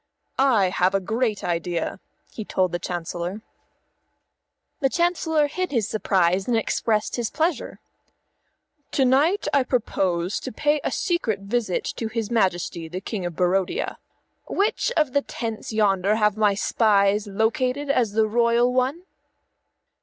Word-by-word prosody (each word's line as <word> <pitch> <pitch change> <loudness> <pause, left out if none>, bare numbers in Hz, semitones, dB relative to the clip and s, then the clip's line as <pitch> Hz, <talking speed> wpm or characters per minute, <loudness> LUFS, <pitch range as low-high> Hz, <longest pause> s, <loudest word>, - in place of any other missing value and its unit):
"I 230 -9 +4
have 185 +1 +1
a - - +3
great 220 +2 -1
idea," 170 +1 -2 0.3
he 220 - -5
told 185 -3 0
the 175 - -2
Chancellor. 175 +3 -4 1.4
The 270 -4 +2
Chancellor 330 -2 +1
hid 365 +4 -3
his 230 -7 0
surprise 190 -3 +1
and 240 -2 +2
expressed 220 0 0
his 235 -3 -1
pleasure. 320 -3 -2 1.1
"To 270 - +3
night 290 +10 +2
I 280 - +5
propose 190 -8 -1
to - - -6
pay 295 +5 +1
a - - 0
secret 235 - -1
visit 205 -1 -1
to 225 - -2
his 225 0 -3
Majesty 175 -6 0
the 175 +3 -5
King 195 -2 -4
of 170 - -7
Barodia. 185 +2 0 0.5
Which 420 +4 0
of 305 -3 +3
the 285 - +4
many - - -25
tents 225 -2 -5
yonder 205 -2 +2
have 210 -2 +2
my 210 -2 +2
spies 205 -1 +2
located 250 +7 0
as 235 -6 +1
the 220 0 +3
royal 235 +2 +2
one?" 260 +7 0
220 Hz, 145 wpm, -24 LUFS, 195-255 Hz, 1.4 s, I